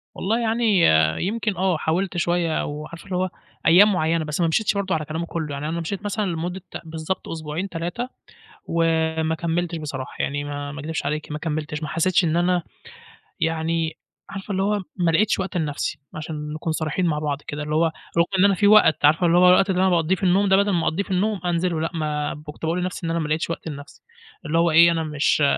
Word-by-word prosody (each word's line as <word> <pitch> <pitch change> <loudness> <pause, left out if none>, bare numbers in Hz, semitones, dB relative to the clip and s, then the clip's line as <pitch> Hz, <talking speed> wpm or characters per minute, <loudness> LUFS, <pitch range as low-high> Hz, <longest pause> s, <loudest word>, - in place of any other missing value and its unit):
والله 220 +5 0
يعني 230 0 0 0.6
يمكن 215 -1 -2
آه، 185 -2 +1
حاولت 175 +4 -1
شوية 170 -1 0
وعارِفة 155 +4 -7
اللي 190 - -4
هو 185 +1 0 0.4
أيام 200 +5 +7
معيّنة، 165 -2 +1
بس 150 +3 -2
ما 170 - +3
مشيتش 205 +7 +1
برضه 200 -2 -1
على 155 -1 -2
كلامه 160 +3 -3
كلّه، 160 -3 -4
يعني 145 +2 -4
أنا 170 +1 -2
مشيت 200 +5 -5
مثلًا 205 +1 -1
لمدة 175 +1 -3 0.2
بالضبط 160 +3 -4
أسبوعين 160 +4 -4
3 175 +10 -4 0.6
وما 160 -1 +1
كملتش 170 +1 -2
بصراحة. 145 -3 -6
يعني 145 +1 -2
ما 145 0 -5
ما 145 - -7
أكدبش 155 -1 -4
عليكِ 150 +1 -3
ما 150 - -3
كملتش، 150 -1 -3
ما 155 - -3
حسيتش 170 +4 +2
إن 165 0 +1
أنا 175 0 +2 0.8
يعني، 165 0 -1 0.3
عارِفة 195 +1 -6
اللي 190 0 0
هو 205 0 +1
ما 175 -3 +1
لقيتش 210 +6 +2
وقت 190 -1 -2
لنفسي، 150 -2 -2 0.2
عشان 150 -1 -5
نكون 160 +1 -3
صريحين 160 +3 -1
مع 150 -3 +1
بعض 145 -1 -2
كده، 145 +1 -4
اللي 150 +1 -2
هو 165 +2 +4 0.3
رغم 170 - +5
إن 195 - +6
أنا 200 - +5
في 205 +3 +3
وقت، 205 -8 +6
عارِفة 160 +4 +4
اللي 170 +1 +4
هو 180 0 +7
الوقت 195 +2 +5
اللي 185 0 +1
أنا 190 - +4
باقضّيه 170 0 +2
في 190 - -10
النوم 190 +2 +3
ده، 190 - +5
بدل 200 0 +2
ما 170 -3 +1
أقضّيه 185 +5 0
في 195 - -10
النوم، 205 +2 +1
أنزِله 170 -1 0
لأ، 165 - -1
ما 150 -2 -2
كنت 150 - -10
باقول 170 +3 0
لنفسي 180 -1 -4
إن 165 - -1
أنا 170 - 0
ما 155 - -2
لقيتش 155 +2 -1
وقت 165 - -5
لنفسي. 145 -1 -9 0.4
اللي 160 +2 0
هو 170 -1 +3
إيه، 170 +2 +7
أنا 165 -1 0
مش 150 -1 +1
165 Hz, 220 wpm, -23 LUFS, 155-185 Hz, 0.8 s, أيام